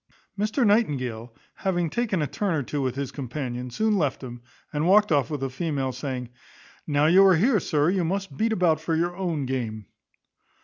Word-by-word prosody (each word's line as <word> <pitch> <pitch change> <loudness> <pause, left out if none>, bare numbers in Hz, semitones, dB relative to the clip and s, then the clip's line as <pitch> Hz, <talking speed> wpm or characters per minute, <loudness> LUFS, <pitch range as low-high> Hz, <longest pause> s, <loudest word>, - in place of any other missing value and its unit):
Mr 215 +5 0
Nightingale, 130 - 0 0.2
having 175 -3 -1
taken 190 -2 -1
a - - +1
turn 185 +5 -1
or 145 - -1
two 145 +3 -3
with 130 -2 -1
his 140 -1 -3
companion, 125 -2 -5
soon 215 - +1
left 145 -4 -1
him, 120 -1 -8 0.3
and 150 +3 0
walked 210 +1 +5
off 140 -5 +2
with 145 -3 -3
a 135 - -1
female, 135 -2 -2
saying, 130 -3 -5 0.6
"Now 145 -1 +2
you 180 +5 +6
are 190 -2 +6
here, 215 +6 +3
sir, 150 -3 +1
you 190 -2 0
must 195 +3 -3
beat 225 +1 0
about 175 -7 +2
for 160 0 -1
your 175 +2 0
own 170 -6 -2
game." 115 -5 -3
155 Hz, 190 wpm, -25 LUFS, 130-190 Hz, 0.6 s, you